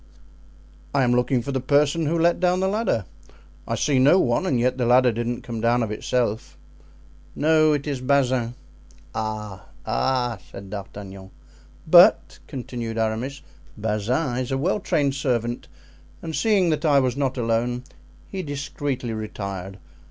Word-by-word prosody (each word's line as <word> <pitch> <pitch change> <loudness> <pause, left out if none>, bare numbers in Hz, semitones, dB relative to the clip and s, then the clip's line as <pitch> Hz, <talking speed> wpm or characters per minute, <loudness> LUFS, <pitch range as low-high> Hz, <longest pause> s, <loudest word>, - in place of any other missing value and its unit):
"I 135 - +4
am 120 - +2
looking 125 0 +1
for 140 - -4
the 135 - -1
person 145 +4 +2
who 165 +3 +1
let 170 +1 +3
down 180 0 +2
the 190 - +1
ladder. 200 - 0 0.6
I 115 - -1
see 140 +1 +1
no 140 +8 +6
one 185 - +1
and 130 -7 +1
yet 125 +2 0
the 120 - +1
ladder 125 0 +5
didn't 120 +2 -3
come 115 -4 -5
down 120 +1 +2
of 110 - -3
itself." 110 0 -2 0.8
"No, 155 0 +4
it 145 -1 -2
is 140 -4 -3
Bazin." 130 -3 +1 0.6
"Ah! 105 -3 -5 0.2
ah!" 120 - 0
said 100 -1 -10
D'Artagnan. 100 -1 -8 0.6
"But," - - +6
continued 120 -3 -5
Aramis, 115 +5 -2 0.3
"Bazin 110 +6 -1
is 130 +1 -3
a 135 - +1
well 180 +9 0
trained 145 -7 0
servant, 120 -3 -2 0.6
and 160 -1 -4
seeing 200 -6 +2
that 155 - -1
I 145 -3 +4
was 130 -2 0
not 135 -2 -1
alone 120 +1 0 0.4
he 195 - -5
discreetly 140 -4 -4
retired. 100 -3 -6
125 Hz, 150 wpm, -23 LUFS, 115-145 Hz, 0.8 s, no